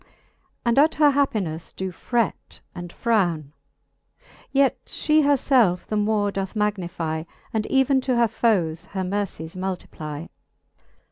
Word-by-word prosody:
And 235 Hz, +2 st, +3 dB
at 310 Hz, +3 st, +4 dB
her 295 Hz, -1 st, +5 dB
happinelTe 210 Hz, -, -1 dB
do 190 Hz, 0 st, -3 dB
fret 235 Hz, +4 st, -2 dB
and 175 Hz, -1 st, -7 dB
frowne: 175 Hz, -12 st, 0 dB, 1.0 s
Yet 275 Hz, -1 st, +2 dB
fhe 310 Hz, 0 st, +2 dB
her 285 Hz, 0 st, +4 dB
felfe 235 Hz, -10 st, +3 dB
the 215 Hz, -, -3 dB
more 210 Hz, -1 st, +1 dB
doth 195 Hz, +1 st, -4 dB
magnify, 175 Hz, -6 st, -2 dB, 0.3 s
And 220 Hz, -1 st, -1 dB
even 265 Hz, 0 st, +3 dB
to 255 Hz, -, +3 dB
her 235 Hz, -1 st, +4 dB
foes 180 Hz, -7 st, +1 dB
her 190 Hz, -, 0 dB
mercies 185 Hz, -4 st, -3 dB
multiply. 170 Hz, -5 st, -5 dB
205 Hz, 130 wpm, -24 LUFS, 175-240 Hz, 1.0 s, her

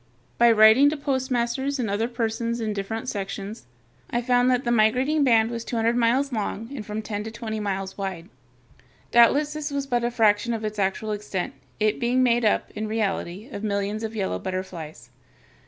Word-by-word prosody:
By 235 Hz, 0 st, +7 dB
writing 220 Hz, +6 st, +7 dB
to 305 Hz, -, -3 dB
postmasters 265 Hz, 0 st, -1 dB
and 245 Hz, -4 st, -1 dB
other 210 Hz, +3 st, 0 dB
persons 235 Hz, 0 st, -2 dB
in 220 Hz, -2 st, -2 dB
different 215 Hz, +4 st, -4 dB
sections, 200 Hz, 0 st, -5 dB, 0.4 s
I 240 Hz, 0 st, -1 dB
found 245 Hz, 0 st, +3 dB
that 250 Hz, 0 st, +2 dB
the 240 Hz, -, 0 dB
migrating 255 Hz, +7 st, +3 dB
band 230 Hz, -3 st, +4 dB
was 230 Hz, -1 st, -4 dB
two 235 Hz, -, -5 dB
hundred 230 Hz, +1 st, +2 dB
miles 245 Hz, +4 st, +2 dB
long 220 Hz, +2 st, -3 dB
and 225 Hz, -, -5 dB
from 210 Hz, +1 st, -5 dB
ten 210 Hz, -1 st, -4 dB
to -, -, -4 dB
twenty 220 Hz, -1 st, -5 dB
miles 195 Hz, -1 st, -3 dB
wide. 185 Hz, -3 st, -4 dB, 0.8 s
Doubtless 285 Hz, +6 st, +5 dB
this 305 Hz, 0 st, -4 dB
was 280 Hz, -1 st, -2 dB
but 245 Hz, -3 st, 0 dB
a 240 Hz, -, +1 dB
fraction 225 Hz, 0 st, +2 dB
of 220 Hz, -1 st, -4 dB
its 215 Hz, 0 st, -4 dB
actual 195 Hz, +2 st, -1 dB
extent, 205 Hz, -3 st, -3 dB, 0.3 s
it 215 Hz, +2 st, +1 dB
being 250 Hz, +1 st, +2 dB
made 240 Hz, -1 st, +3 dB
up, 215 Hz, -, +1 dB
in 215 Hz, +1 st, -4 dB
reality, 210 Hz, -2 st, -2 dB
of 205 Hz, -, -6 dB
millions 205 Hz, 0 st, -1 dB
of 225 Hz, 0 st, -5 dB
yellow 195 Hz, -3 st, -2 dB
butterflies. 165 Hz, -9 st, -6 dB
225 Hz, 190 wpm, -24 LUFS, 205-245 Hz, 0.8 s, By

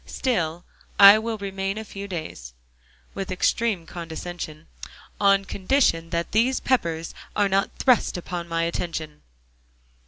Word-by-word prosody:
Still 175 Hz, -10 st, -2 dB, 0.3 s
I 200 Hz, +1 st, +10 dB
will 225 Hz, 0 st, -3 dB
remain 195 Hz, 0 st, -3 dB
a 220 Hz, -, -5 dB
few 200 Hz, -1 st, -8 dB
days," 155 Hz, -, -7 dB, 0.6 s
with 195 Hz, -1 st, -5 dB
extreme 190 Hz, 0 st, 0 dB
condescension, 165 Hz, -1 st, -7 dB, 0.5 s
"on 195 Hz, -1 st, +4 dB
condition 190 Hz, -5 st, +1 dB
that 170 Hz, 0 st, -2 dB
these 240 Hz, +5 st, +2 dB
Peppers 170 Hz, -10 st, -1 dB, 0.2 s
are 205 Hz, -1 st, +3 dB
not 195 Hz, 0 st, +1 dB
thrust 250 Hz, -7 st, +2 dB
upon 175 Hz, -1 st, -5 dB
my 165 Hz, 0 st, -1 dB
attention." 160 Hz, -3 st, -4 dB
185 Hz, 125 wpm, -24 LUFS, 165-205 Hz, 0.6 s, I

